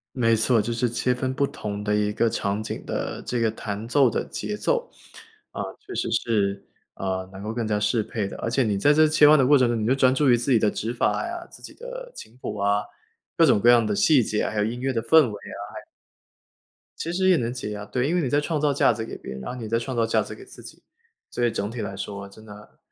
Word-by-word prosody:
没 115 Hz, -3 st, +3 dB
错， 115 Hz, +2 st, +3 dB
就 115 Hz, +3 st, -1 dB
是 120 Hz, +1 st, 0 dB
切 120 Hz, +2 st, 0 dB
分 130 Hz, +1 st, -2 dB
不 140 Hz, 0 st, +2 dB
同 105 Hz, -6 st, -6 dB
的 105 Hz, 0 st, +1 dB
一 105 Hz, 0 st, +1 dB
个 115 Hz, +2 st, +1 dB
场 100 Hz, 0 st, -2 dB
景 110 Hz, -, -6 dB
的 -, -, -4 dB
这 125 Hz, -, -3 dB
个 115 Hz, -1 st, +2 dB
弹 105 Hz, 0 st, -6 dB
奏 135 Hz, 0 st, +4 dB
的 -, -, -2 dB
节 210 Hz, -, -5 dB
奏， 485 Hz, -, -1 dB, 0.6 s
啊， -, -, -5 dB, 0.2 s
确 405 Hz, -2 st, -10 dB
实 -, -, -2 dB
是， 100 Hz, -3 st, 0 dB, 0.3 s
呃， 95 Hz, -1 st, -3 dB
能 95 Hz, +1 st, -9 dB
够 110 Hz, +1 st, -4 dB
更 115 Hz, -1 st, -2 dB
加 105 Hz, -1 st, 0 dB
适 110 Hz, +2 st, +1 dB
配 105 Hz, -1 st, -3 dB
的。 -, -, -8 dB
而 -, -, -3 dB
且 130 Hz, +3 st, +2 dB
你 105 Hz, -3 st, 0 dB
在 100 Hz, +9 st, +3 dB
这 155 Hz, +1 st, +5 dB
切 150 Hz, -1 st, +6 dB
换 155 Hz, -, +7 dB
的 135 Hz, -, +4 dB
过 145 Hz, +3 st, +6 dB
程 130 Hz, -2 st, +3 dB
中， 120 Hz, -1 st, 0 dB
你 105 Hz, -, -1 dB
就 125 Hz, -, +3 dB
专 130 Hz, -1 st, +3 dB
注 145 Hz, +2 st, +2 dB
于 -, -, +6 dB
自 120 Hz, +3 st, -1 dB
己 120 Hz, -, +6 dB
的 105 Hz, -1 st, +2 dB
指 115 Hz, -, -3 dB
法 125 Hz, -, 0 dB
呀， 345 Hz, 0 st, -6 dB
自 -, -, -13 dB
己 -, -, -11 dB
的 -, -, -8 dB
琴 110 Hz, -, -11 dB
谱 -, -, -5 dB
啊， 100 Hz, +1 st, +1 dB, 0.6 s
各 -, -, +6 dB
种 -, -, +4 dB
各 120 Hz, -, +4 dB
样 120 Hz, -2 st, +6 dB
的 105 Hz, -1 st, -1 dB
细 140 Hz, +2 st, +4 dB
节， 105 Hz, 0 st, -1 dB
还 110 Hz, -, -6 dB
有 105 Hz, -, +2 dB
音 120 Hz, +3 st, -4 dB
乐 135 Hz, +1 st, 0 dB
的 115 Hz, -3 st, -1 dB
氛 160 Hz, 0 st, +6 dB
围 -, -, -7 dB
啊， 105 Hz, -, -9 dB, 0.2 s
还 -, -, -5 dB, 1.2 s
其 170 Hz, -, -3 dB
实 190 Hz, +1 st, +2 dB
也 180 Hz, -, +5 dB
能 120 Hz, -2 st, -1 dB
解 125 Hz, -4 st, -5 dB
压， 105 Hz, 0 st, -6 dB
对， 125 Hz, +5 st, -1 dB
因 -, -, 0 dB
为 180 Hz, -, +2 dB
你 135 Hz, -, -1 dB
在 145 Hz, +3 st, +2 dB
创 155 Hz, 0 st, -2 dB
造 145 Hz, -1 st, +2 dB
价 135 Hz, -, +4 dB
值 110 Hz, -1 st, -4 dB
给 -, -, -7 dB
别 -, -, -9 dB
人， 65 Hz, -, -6 dB
然 65 Hz, -, -6 dB
后 -, -, -8 dB
你 110 Hz, -2 st, -6 dB
在 115 Hz, +1 st, +1 dB
创 130 Hz, +2 st, -5 dB
造 115 Hz, -1 st, +2 dB
价 115 Hz, -, +2 dB
值 -, -, -7 dB
给 390 Hz, -, -13 dB
自 385 Hz, -, -14 dB
己， -, -, -13 dB, 0.5 s
所 120 Hz, -, 0 dB
以 -, -, +3 dB
整 105 Hz, -1 st, -3 dB
体 120 Hz, -, -7 dB
来 100 Hz, -2 st, -4 dB
说 100 Hz, 0 st, -6 dB
真 110 Hz, +2 st, -15 dB
的， 105 Hz, 0 st, -14 dB
115 Hz, 300 characters per minute, -24 LUFS, 105-135 Hz, 1.2 s, 换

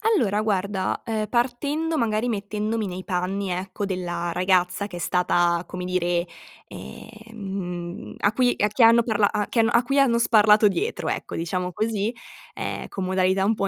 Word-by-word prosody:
Allora 210 Hz, -, +1 dB
guarda, 200 Hz, -2 st, -1 dB
ehm, 215 Hz, -2 st, -2 dB
partendo 285 Hz, +7 st, 0 dB
magari 225 Hz, 0 st, 0 dB
mettendomi 210 Hz, 0 st, -2 dB
nei 185 Hz, 0 st, -6 dB
panni, 185 Hz, +2 st, -2 dB
ecco, 185 Hz, +3 st, -3 dB
della 175 Hz, -2 st, -3 dB
ragazza 185 Hz, +2 st, +1 dB
che 175 Hz, -, -8 dB
è -, -, -6 dB
stata, 175 Hz, -1 st, +1 dB
come 180 Hz, 0 st, -6 dB
dire, 175 Hz, -1 st, 0 dB, 0.4 s
ehm, 195 Hz, -, -7 dB
a 205 Hz, -, +1 dB
cui 245 Hz, 0 st, +2 dB
a 210 Hz, -, +2 dB
chi 210 Hz, +4 st, -2 dB
hanno 230 Hz, +1 st, +7 dB
parla 215 Hz, -3 st, +2 dB
a 210 Hz, -1 st, -1 dB
chi 235 Hz, -, -1 dB
hanno 225 Hz, +1 st, +3 dB
a 235 Hz, +1 st, +4 dB
cui 275 Hz, +4 st, +1 dB
hanno 245 Hz, -4 st, +4 dB
sparlato 215 Hz, -2 st, +5 dB
dietro, 390 Hz, -, -2 dB
ecco, -, -, -4 dB
diciamo 180 Hz, +2 st, -2 dB
così, 215 Hz, 0 st, -1 dB, 0.4 s
ehm, -, -, -4 dB
con 190 Hz, -, -4 dB
modalità 190 Hz, +1 st, +1 dB
un 215 Hz, -, +3 dB
po' 200 Hz, -, -1 dB
200 Hz, 170 wpm, -24 LUFS, 185-225 Hz, 0.4 s, hanno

